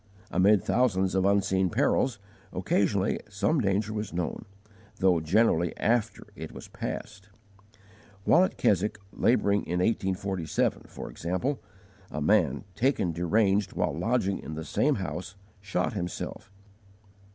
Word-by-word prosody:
Amid 95 Hz, +2 st, +4 dB
thousands 95 Hz, -7 st, +2 dB
of 95 Hz, 0 st, +2 dB
unseen 95 Hz, -2 st, +2 dB
perils, 125 Hz, +6 st, +1 dB, 0.3 s
occasionally 95 Hz, +1 st, +1 dB
some 105 Hz, +9 st, +1 dB
danger 105 Hz, +1 st, 0 dB
was 105 Hz, -1 st, -4 dB
known, 85 Hz, -1 st, -3 dB, 0.5 s
though 90 Hz, -3 st, +3 dB
generally 85 Hz, 0 st, +2 dB
after 115 Hz, 0 st, 0 dB
it -, -, -7 dB
was -, -, -9 dB
passed. 100 Hz, -1 st, -6 dB, 0.9 s
While 175 Hz, -, +5 dB
at 185 Hz, -, -1 dB
Keswick 105 Hz, +2 st, +2 dB, 0.2 s
labouring 100 Hz, -4 st, +2 dB
in 90 Hz, -, -1 dB
1847, 95 Hz, -3 st, 0 dB
for -, -, -8 dB
example, 95 Hz, -, -2 dB, 0.5 s
a 75 Hz, -, -4 dB
man, 75 Hz, -, +2 dB
taken 115 Hz, -5 st, +1 dB
deranged 95 Hz, +3 st, +1 dB
while 85 Hz, -5 st, 0 dB
lodging 100 Hz, +2 st, 0 dB
in 80 Hz, -, -7 dB
the 80 Hz, 0 st, -5 dB
same 150 Hz, -, +2 dB
house, 95 Hz, -1 st, -5 dB, 0.3 s
shot 95 Hz, -2 st, -1 dB
himself. 90 Hz, 0 st, -5 dB
95 Hz, 125 wpm, -28 LUFS, 90-105 Hz, 0.9 s, While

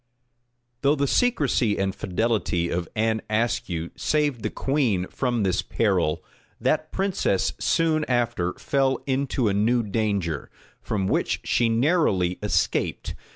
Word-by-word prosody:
Though 140 Hz, +1 st, +3 dB
the 140 Hz, -1 st, +1 dB
secrecy 140 Hz, -, +2 dB
and 95 Hz, 0 st, 0 dB
fidelity 100 Hz, -4 st, -1 dB
of 85 Hz, -1 st, -2 dB
Anne 110 Hz, 0 st, +1 dB
Ascue 105 Hz, -7 st, -1 dB
saved 150 Hz, -6 st, 0 dB
the -, -, -1 dB
queen 125 Hz, -10 st, 0 dB
from 120 Hz, -4 st, -1 dB
this 95 Hz, -2 st, +1 dB
peril, 95 Hz, -8 st, 0 dB, 0.4 s
that -, -, 0 dB
princess 190 Hz, -, 0 dB
soon 160 Hz, -2 st, +2 dB
after 120 Hz, -8 st, 0 dB
fell 135 Hz, -2 st, 0 dB
into 135 Hz, -3 st, 0 dB
a 100 Hz, -, +1 dB
new 115 Hz, +4 st, +2 dB
danger, 100 Hz, -, -1 dB, 0.3 s
from 100 Hz, -3 st, -2 dB
which -, -, 0 dB
she 120 Hz, -1 st, +2 dB
narrowly 115 Hz, -, +2 dB
escaped. -, -, 0 dB
115 Hz, 125 wpm, -24 LUFS, 95-135 Hz, 0.4 s, Though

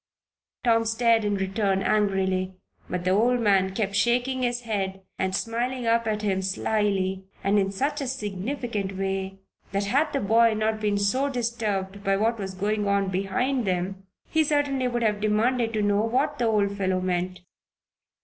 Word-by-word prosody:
Tom 230 Hz, -2 st, +3 dB
stared 225 Hz, 0 st, +3 dB
in 205 Hz, -1 st, 0 dB
return 195 Hz, 0 st, 0 dB
angrily, 190 Hz, -3 st, +1 dB, 0.3 s
but 180 Hz, -1 st, -2 dB
the 185 Hz, -, +1 dB
old 240 Hz, +5 st, +3 dB
man 195 Hz, -4 st, +2 dB
kept 200 Hz, -2 st, -1 dB
shaking 245 Hz, +5 st, +1 dB
his 245 Hz, -1 st, 0 dB
head 195 Hz, -4 st, -3 dB, 0.2 s
and 190 Hz, 0 st, 0 dB
smiling 240 Hz, +3 st, -2 dB
up 230 Hz, 0 st, +2 dB
at 215 Hz, -1 st, -1 dB
him 190 Hz, -2 st, +1 dB
slily 190 Hz, -1 st, 0 dB, 0.2 s
and 200 Hz, +1 st, +3 dB
in 195 Hz, 0 st, 0 dB
such 285 Hz, +9 st, -1 dB
a 275 Hz, -, -2 dB
significant 210 Hz, -3 st, -3 dB
way 195 Hz, 0 st, -2 dB, 0.4 s
that, 200 Hz, +1 st, 0 dB
had 280 Hz, +9 st, +1 dB
the 275 Hz, -, 0 dB
boy 225 Hz, +2 st, +4 dB
not 215 Hz, 0 st, 0 dB
been 205 Hz, -1 st, +1 dB
so 255 Hz, +8 st, +1 dB
disturbed 215 Hz, -6 st, -2 dB
by 195 Hz, -1 st, +2 dB
what 225 Hz, +2 st, +1 dB
was 190 Hz, -1 st, -5 dB
going 205 Hz, +2 st, -1 dB
on 200 Hz, -1 st, +1 dB
behind 215 Hz, +8 st, 0 dB
them, 190 Hz, +1 st, -2 dB, 0.2 s
he 320 Hz, 0 st, +2 dB
certainly 285 Hz, -3 st, +1 dB
would 240 Hz, -1 st, -1 dB
have 210 Hz, -2 st, +1 dB
demanded 225 Hz, +3 st, +1 dB
to 215 Hz, -2 st, 0 dB
know 205 Hz, 0 st, +2 dB
what 225 Hz, +3 st, 0 dB
the 240 Hz, -, +2 dB
old 205 Hz, -2 st, +1 dB
fellow 190 Hz, -2 st, 0 dB
meant. 185 Hz, 0 st, -2 dB
210 Hz, 170 wpm, -26 LUFS, 195-235 Hz, 0.4 s, boy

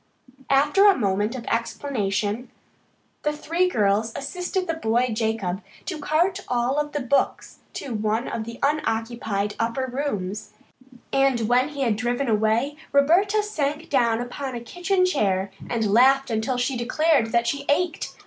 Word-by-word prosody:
After 295 Hz, +9 st, +5 dB
a 395 Hz, -, +4 dB
moment 205 Hz, +1 st, 0 dB
of 240 Hz, -2 st, -6 dB
explanation 230 Hz, -2 st, -2 dB, 0.7 s
the 300 Hz, -, 0 dB
three 335 Hz, +4 st, 0 dB
girls 215 Hz, -, +1 dB
assisted 360 Hz, +5 st, -3 dB
the 330 Hz, -, -1 dB
boy 245 Hz, -5 st, +1 dB
Jacob 215 Hz, -4 st, -1 dB, 0.2 s
to 345 Hz, -5 st, -4 dB
cart 325 Hz, +6 st, +1 dB
all 250 Hz, +4 st, +1 dB
the 295 Hz, 0 st, -4 dB
books 265 Hz, +2 st, 0 dB
to 265 Hz, -, -5 dB
one 220 Hz, +2 st, -1 dB
of 225 Hz, -, -3 dB
the 230 Hz, +1 st, -8 dB
unoccupied 225 Hz, -7 st, -1 dB
upper 230 Hz, +3 st, -1 dB
rooms, 215 Hz, -7 st, -4 dB, 0.6 s
and 270 Hz, -3 st, +3 dB
when 245 Hz, +5 st, +2 dB
he 285 Hz, -2 st, -6 dB
had 230 Hz, -5 st, +1 dB
driven 245 Hz, +3 st, -1 dB
away 225 Hz, +6 st, +1 dB
Roberta 370 Hz, +9 st, +3 dB
sank 305 Hz, -6 st, -3 dB
down 235 Hz, -4 st, +3 dB
upon 255 Hz, +2 st, -5 dB
a -, -, -3 dB
kitchen 360 Hz, -, 0 dB
chair 195 Hz, -, 0 dB, 0.2 s
and 225 Hz, -4 st, 0 dB
laughed 270 Hz, +2 st, +5 dB
until 225 Hz, +3 st, -1 dB
she 245 Hz, +2 st, 0 dB
declared 255 Hz, +2 st, +2 dB
that 235 Hz, +1 st, +2 dB
she 280 Hz, +3 st, -2 dB
ached. 335 Hz, +3 st, 0 dB
250 Hz, 150 wpm, -24 LUFS, 225-295 Hz, 0.7 s, After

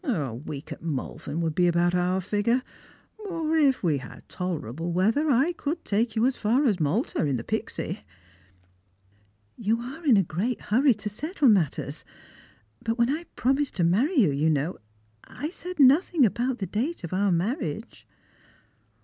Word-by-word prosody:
A 160 Hz, -, -1 dB
week 140 Hz, +4 st, -7 dB
at -, -, -7 dB
Malvern 160 Hz, +1 st, -4 dB
would 165 Hz, -2 st, -1 dB
be 175 Hz, +2 st, +3 dB
about 175 Hz, 0 st, +2 dB
our 180 Hz, +1 st, +1 dB
figure: 225 Hz, +7 st, 0 dB, 0.6 s
or 330 Hz, -6 st, -2 dB
if 280 Hz, -7 st, +3 dB
we 155 Hz, -5 st, +2 dB
had 130 Hz, -, -12 dB
tolerable 165 Hz, -, -4 dB
weather, 225 Hz, -, +2 dB
I 275 Hz, +7 st, +3 dB
could 320 Hz, 0 st, -4 dB
take 220 Hz, +2 st, 0 dB
you 225 Hz, +1 st, +3 dB
as 260 Hz, 0 st, +1 dB
far 240 Hz, +7 st, +2 dB
as 205 Hz, -8 st, +2 dB
Malta 165 Hz, -, 0 dB
in 140 Hz, -4 st, 0 dB
the 115 Hz, -, -5 dB
Pixy." -, -, -3 dB
_" -, -, -26 dB, 1.5 s
You 225 Hz, +1 st, 0 dB
are 270 Hz, +8 st, -8 dB
in 260 Hz, -8 st, +5 dB
a 195 Hz, -, +4 dB
great 195 Hz, +10 st, -2 dB
hurry 250 Hz, +3 st, +3 dB
to 210 Hz, 0 st, -7 dB
settle 300 Hz, -, +1 dB
matters; 155 Hz, -6 st, +1 dB, 0.8 s
but 225 Hz, +1 st, -1 dB
when 235 Hz, +2 st, +3 dB
I 320 Hz, +4 st, -3 dB
pro 260 Hz, +3 st, +2 dB
mised 285 Hz, 0 st, -1 dB
to 180 Hz, -, 0 dB
marry 225 Hz, -, +2 dB
you, 190 Hz, -, +4 dB
just 155 Hz, +3 st, +2 dB
now, 150 Hz, +4 st, -1 dB, 0.5 s
I 300 Hz, -, -5 dB
said 365 Hz, 0 st, -7 dB
nr^thing 290 Hz, +1 st, +5 dB
about 240 Hz, +4 st, 0 dB
the 195 Hz, -, -3 dB
date 235 Hz, -, -3 dB
of 170 Hz, -, -5 dB
our 195 Hz, +1 st, +2 dB
marriage." 195 Hz, -, -3 dB
215 Hz, 175 wpm, -26 LUFS, 170-270 Hz, 1.5 s, in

